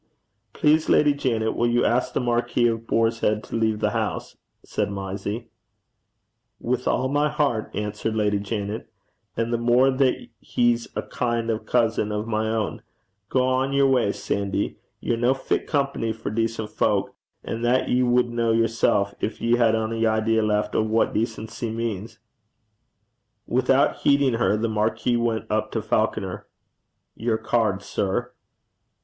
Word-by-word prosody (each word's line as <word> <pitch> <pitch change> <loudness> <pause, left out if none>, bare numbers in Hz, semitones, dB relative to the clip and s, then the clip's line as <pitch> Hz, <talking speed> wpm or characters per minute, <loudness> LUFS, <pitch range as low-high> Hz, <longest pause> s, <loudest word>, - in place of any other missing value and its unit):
'Please, 155 +1 +3
Lady 150 -1 +5
Janet, 115 -6 -1
will 120 - +1
you 120 0 +2
ask 120 +2 +1
the - - +1
Marquis 120 0 +1
of 115 -1 0
Boarshead 115 -2 +1
to - - -7
leave 110 -2 0
the - - +1
house,' - - -3 0.3
said - - -2
Mysie. 100 +3 -4 1.1
'With 125 +1 -2
all 130 - +1
my 145 +2 +1
hert,' 140 -7 0
answered 105 +1 -3
Lady 105 -2 +1
Janet; 105 +1 -4 0.5
'and 115 +1 -1
the 120 - +1
mair 120 +3 +4
that 130 -1 +1
he's 120 -1 +1
a - - -2
kin' 120 -1 -1
o' 110 - 0
a - - -12
cousin 110 -2 0
o' 105 0 -1
my 110 -1 -1
ain. 110 -6 -2 0.5
Gang 130 +1 +1
yer 140 0 +4
wa's, 125 -6 +2
Sandy. 100 -1 -2 0.2
Ye're 120 - 0
no 120 +3 +2
fit 135 - -2
company 140 -6 0
for 110 - -5
decent 115 -1 -2
fowk; - - 0 0.3
an' 115 - -4
that 120 +2 +2
ye 125 - +3
wad 125 0 +3
ken 120 0 -8 0.2
yersel', 110 -3 +2
gin - - -1
ye 120 +1 +2
had 115 -2 +3
ony 115 0 0
idea 110 0 +2
left 105 -1 0
o' - - +2
what 110 +1 +1
decency 115 +1 -3
means.' 110 -1 -4 1.3
Without - - +2
heeding 140 -2 +3
her, 105 -3 +2
the 115 +2 0
marquis 110 +3 0
went 115 -1 -1
up 110 0 0
to 115 - 0
Falconer. 105 -3 -1 0.7
'Your 115 -1 0
card, 110 -5 0
sir.' 110 +7 -2
115 Hz, 155 wpm, -24 LUFS, 110-120 Hz, 1.3 s, Lady